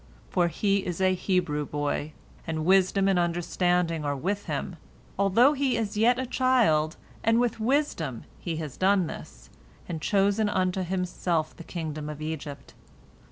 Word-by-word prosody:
For 175 -2 +3
he 200 +3 +1
is 175 -1 -4
a 185 0 +3
Hebrew 180 -5 0
boy, 145 +1 -3 0.3
and 160 -1 -2
wisdom 190 +1 +4
and 190 -2 +3
understanding 175 -1 0
are 145 -1 -1
with 195 +8 -2
him, - - -4 0.4
although 225 +8 +5
he 275 -3 +1
is 210 -2 -2
yet 235 +4 +4
a 260 - -2
child, 235 -12 +2 0.3
and 225 +1 +3
with 240 -2 0
wisdom 220 - 0 0.2
has 160 -5 -4
he - - -18
done 190 -1 +3
this, - - -10 0.4
and 165 -3 -4
chosen 205 +3 +2
unto 185 -1 0
himself 180 -3 -1
the 170 - -10
kingdom 155 -3 -5
of 150 -1 -7
Egypt. 155 -3 -6
180 Hz, 155 wpm, -27 LUFS, 155-205 Hz, 0.4 s, although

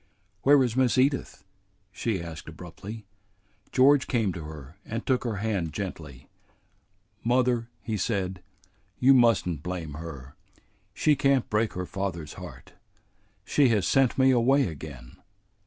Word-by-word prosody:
"Where 140 0 +6
is 120 -2 -1
Miss 130 -1 +2
Edith?" 135 +2 0 0.5
she 95 -2 -2
asked 85 -1 -8
abruptly. 90 +6 -9 0.7
George 135 +1 +5
came 110 -7 0
to 80 -3 -7
her 75 -1 -10
and 115 +1 -5
took 130 -2 +1
her 115 -3 -1
hand 100 -6 -2
gently. 75 -9 -7 1.0
"Mother," 120 -1 +1
he 110 -2 -2
said, 95 -3 -2 0.6
"you 135 +2 +6
must 120 -7 +4
n't 80 -5 -3
blame 85 -3 -5
her. 70 -4 -8 0.6
She 150 -1 +3
can't 135 -2 +2
break 110 +1 +1
her 90 0 -4
father's 85 -6 -4
heart. - - -11 0.7
She 140 +3 +3
has 105 -6 +2
sent 135 -2 +3
me 130 0 +5
away 130 +3 +3
again." 70 - -9
105 Hz, 140 wpm, -27 LUFS, 85-125 Hz, 1.0 s, Where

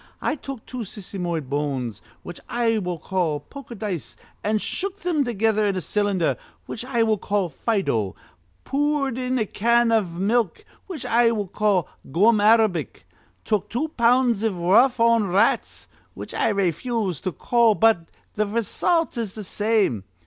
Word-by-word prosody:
I - - 0
took 275 -5 -7
two 255 - -7
sisymoid 180 - -4
bones, 135 -6 -3 0.2
which 175 - -8
I 230 -2 +1
will 180 -3 -3
call 165 -3 -1
poker 245 - -11
dice, 200 -7 -4 0.3
an' 215 +1 +1
shook 390 - -3
thim 345 -6 0
together 220 -3 +1
in 200 - 0
a - - -1
cylinder, 185 - 0 0.3
which 230 - -6
I 245 -3 +1
will 220 -2 +1
call 200 -3 -1
Fido, 135 - -1 0.5
poored 285 -2 0
in 255 0 -1
a 220 - +1
can 235 +3 +2
iv 210 -7 +1
milk, 200 +2 0 0.2
which 350 -8 -7
I 235 0 +4
will 215 -3 -1
call 200 -4 +1 0.2
gum 210 +7 +4
arabic, 210 - +2 0.4
took 210 -1 0
two 260 +9 -2
pounds 240 -4 +3
iv 220 -4 0
rough 225 +9 +4
on 230 -2 +4
rats, 190 +2 +1 0.3
which - - -8
I - - +1
rayfuse 195 - -1
to 185 - -2
call; 235 +2 +2
but 220 -7 +3 0.2
th' - - -15
raysult 235 - 0
is 215 -4 -4
th' 215 -2 -7
same.' 205 - +1
215 Hz, 155 wpm, -23 LUFS, 185-235 Hz, 0.5 s, I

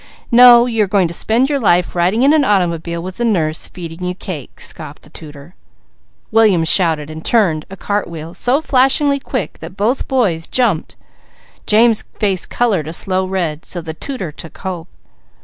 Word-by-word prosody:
"No, 240 0 +8
you 225 -3 +1
are - - -1
going 190 -2 +2
to - - -4
spend 230 +9 +1
your 285 -1 -1
life 180 -6 +2
riding 185 +8 +1
in 285 +3 +5
an 310 -2 +3
automobile 170 -6 -1
with 185 +3 -8
a - - 0
nurse, 165 -9 0
feeding 170 -1 -9
you 180 0 -3
cake!" 165 -8 -8
scoffed - - -6
the - - -15
tutor. 150 +1 -12 0.8
William 215 -6 +4
shouted 160 -3 +1
and 160 +1 -9
turned 175 -10 +1
a 195 - -8
cart 205 +2 -2
wheel 165 0 -8
so 255 - +1
flashingly 280 0 +2
quick 255 -6 -4
that 165 +4 -10
both 225 +6 -1
boys 195 -12 0
jumped, 225 -11 -1 0.7
James' 225 +1 +4 0.2
face 195 -4 0
coloured 200 -11 0
a 160 - -5
slow 185 +1 0
red, 175 -5 -3
so 175 - -4
the 160 -1 -6
tutor 195 - -5
took 160 +2 -11
hope. 180 -3 -6
185 Hz, 180 wpm, -16 LUFS, 165-235 Hz, 0.8 s, No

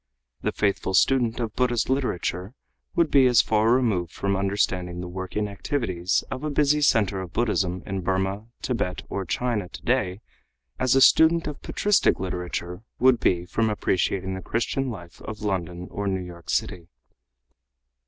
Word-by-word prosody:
The - - 0
faithful 100 -2 0
student 120 -2 +3
of 115 -3 -3
Buddhist 120 -3 +1
literature 115 -6 -2 0.4
would 170 -2 +2
be 135 -2 +6
as 125 -1 +5
far 110 +1 +2
removed 110 -10 +1
from 100 +3 -1
understanding 95 -2 -1
the 90 - -5
working 95 +3 -3
activities 100 - -1
of 130 - -4
a 155 - -1
busy 150 +1 +2
center 100 -8 +2
of 90 -1 -8
Buddhism 95 -6 0
in 95 -1 -3
Burmah, 95 +3 -1 0.2
Tibet 105 -8 -2
or 100 -1 -3
China 105 0 -1
today 105 -3 -1 0.6
as 130 0 +3
a 135 - +5
student 165 +4 +6
of 150 -2 -6
patristic 205 -1 +2
literature 90 0 -4 0.2
would 130 -1 +4
be 90 -1 +1
from 110 +4 0
appreciating 95 -2 0
the 95 - -5
Christian 125 +7 -1
life 85 -7 -9
of 110 0 -7
London 90 -3 -3
or 100 0 -3
New 95 -1 -1
York 85 -1 -12
City. 85 -2 -1
100 Hz, 155 wpm, -25 LUFS, 90-125 Hz, 0.6 s, be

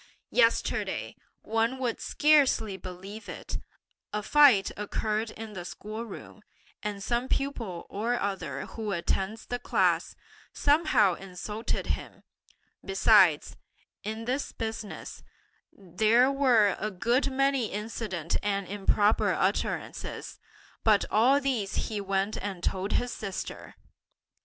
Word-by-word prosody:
Yesterday, - - +1 0.3
one 225 +3 0
would 250 -3 -2
scarcely 280 -9 +3
believe 190 +4 -9
it, - - -5 0.5
a 210 0 -2
fight 275 -7 +6
occurred 215 +2 -2
in 220 -1 -8
the 180 -3 -6
school 215 +5 -6
room, 215 0 -10 0.4
and 205 -1 -4
some 240 +3 0
pupil 230 -13 -2
or 235 +4 -1
other 190 -9 -3
who 215 -3 -4
attends 190 +5 -2
that 245 0 -4
class, - - +1 0.4
somehow 285 - +3
insulted 195 +5 -4
him; - - -4 0.6
besides, 395 - +4 0.5
in 220 +2 -4
this 260 +4 -2
business, 220 -2 -6 0.5
there 215 +7 +3
were 245 -8 +4
a 215 - -1
good 235 +8 +1
many 275 -3 +1
indecent 205 -6 -3
and 200 -2 -1
improper 205 +2 +2
utterances, - - -2 0.4
but 215 -3 +4
all 250 +6 +5
these 255 -8 -1
he 210 -2 -3
went 195 +1 -1
and 195 -4 -5
told 190 +2 -1
his 245 0 0
sister! 195 -3 -6
215 Hz, 115 wpm, -28 LUFS, 195-245 Hz, 0.6 s, fight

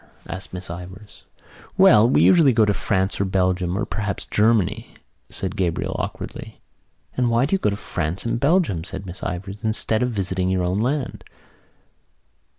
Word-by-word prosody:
asked 95 0 -7
Miss 90 0 -5
Ivors. 95 +4 -10 0.5
"Well, 110 +3 +6
we - - +4
usually 160 -7 +6
go 110 -1 +4
to 105 - +2
France 95 -1 -1
or - - +3
Belgium 95 -1 0
or 110 - -1
perhaps 105 -2 -3
Germany," 105 -3 +1 0.3
said 95 +1 -4
Gabriel 90 -5 -1
awkwardly. - - -6 0.6
"And 125 -1 +1
why 120 +2 +3
do 150 - -3
you 195 - +3
go 105 - +1
to 100 - -2
France 90 -2 -3
and 115 0 -1
Belgium," 140 - +2
said 95 +1 -7
Miss 90 -1 -7
Ivors, 95 +4 -5
"instead 110 0 0
of 125 - +1
visiting 95 -4 -1
your 95 -1 +1
own 90 +3 0
land?" 130 +3 -2
100 Hz, 165 wpm, -22 LUFS, 95-115 Hz, 0.6 s, Well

